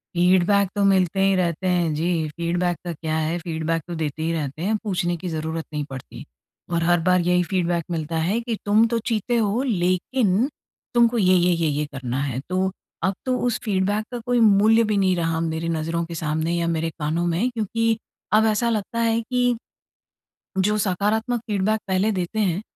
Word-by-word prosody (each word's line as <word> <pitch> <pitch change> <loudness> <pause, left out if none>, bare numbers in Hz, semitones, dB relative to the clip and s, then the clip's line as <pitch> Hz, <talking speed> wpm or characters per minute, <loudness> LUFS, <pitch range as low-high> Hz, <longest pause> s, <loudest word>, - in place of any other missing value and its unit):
Feedback 185 +2 +3
तो 205 - +1
मिलते 190 -1 +2
ही 195 0 +4
रहते 180 0 0
हैं 175 -3 +1
जी, 165 0 0
फीडबैक 175 0 0
का 175 - -2
क्या 155 0 -3
है? 160 +2 -1
फीडबैक 165 -1 -2
तो 175 - -5
देते 155 0 -3
ही 165 - 0
रहते 150 -1 -4
हैं, 210 +4 +1
पूछने 175 -4 -1
की 180 +2 -5
ज़रूरत 160 0 -3
नहीं 150 -1 -1
पड़ती। 130 -1 -9 0.5
और 165 0 +1
हर 175 0 +3
बार 180 +2 +3
यही 180 +1 +2
फीडबैक 175 -2 0
मिलता 165 0 -2
है 185 +8 +1
कि 230 -1 -2
तुम 215 +3 +5
तो 235 0 0
चीते 235 +1 0
हो 220 +2 +1
लेकिन 200 +2 +1 0.5
तुमको 235 0 +4
ये-ये, 180 -3 +4
ये-ये 150 -3 0
करना 135 -2 -4
है। 130 -3 -2
तो 185 +1 0 0.3
अब 195 - +2
तो 255 -1 +1
उस 240 - -1
फीडबैक 205 0 0
का 245 - -4
कोई 245 -1 +2
मूल्य 220 +1 +5
भी 210 -2 0
नहीं 190 -2 +3
रहा 165 -1 0
मेरे 165 0 -2
नज़रों 165 +1 -1
के 170 0 -7
सामने 160 +1 -1
या 170 0 0
मेरे 165 0 0
कानों 160 +3 -1
में 180 +9 +1
क्योंकि 230 0 0 0.4
अब 220 +1 +5
ऐसा 220 +2 +2
लगता 225 +1 -2
है 230 0 +2
कि 245 +1 +1 1.0
जो 210 +3 +2
सकारात्मक 215 +5 0
फीडबैक 210 +1 +1
पहले 190 +3 +1
देते 185 +3 -2
हैं, 190 -1 +1
180 Hz, 185 wpm, -23 LUFS, 165-215 Hz, 1.0 s, तुम